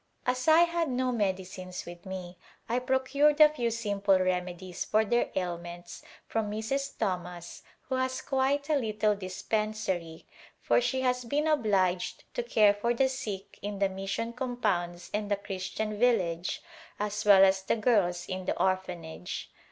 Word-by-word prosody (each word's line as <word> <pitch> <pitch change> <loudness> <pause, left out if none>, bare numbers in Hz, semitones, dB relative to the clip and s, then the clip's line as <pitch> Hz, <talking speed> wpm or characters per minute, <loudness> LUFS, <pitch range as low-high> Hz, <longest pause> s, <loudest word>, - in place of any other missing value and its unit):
As 255 +2 0
I 320 +1 +7
had 340 -2 +2
no 255 0 0
medicines 185 -4 -3
with 175 +2 -10
me 185 -1 -6 0.3
I 240 +2 +1
procured 265 +3 +2
a 305 -1 +9
few 245 -6 -1
simple 205 -4 +1
reme 180 -1 0
dies 180 -1 -5
for 215 +1 +2
their 240 +3 +1
ailments 175 -1 -5 0.2
from 220 -2 -1
Mrs. 270 +7 -2
Thomas 180 -2 -3 0.2
who 265 - -6
has 260 0 -1
quite 275 +1 +1
a 305 - +3
little 215 -4 +1
dispensary 190 -3 -3 0.3
for - - +3
she 260 +2 0
has 250 -1 +1
been 285 +6 0
obliged 195 - +1
to - - -1
care 215 - +4
for 235 +4 0
the 265 +2 +3
sick 200 -6 -6
in 205 0 -4
the 195 0 +2
mission 195 +5 -3
compounds 200 -9 -2
and 210 0 -1
the 205 - +3
Christian 200 +1 -4
village 180 -8 +1 0.4
as 210 0 -2
well 195 -2 +8
as 190 0 +3
the 190 - 0
girls 200 -6 +2
in 185 -1 -4
the - - -2
Orphanage. 180 -2 -2
210 Hz, 160 wpm, -29 LUFS, 185-250 Hz, 0.4 s, a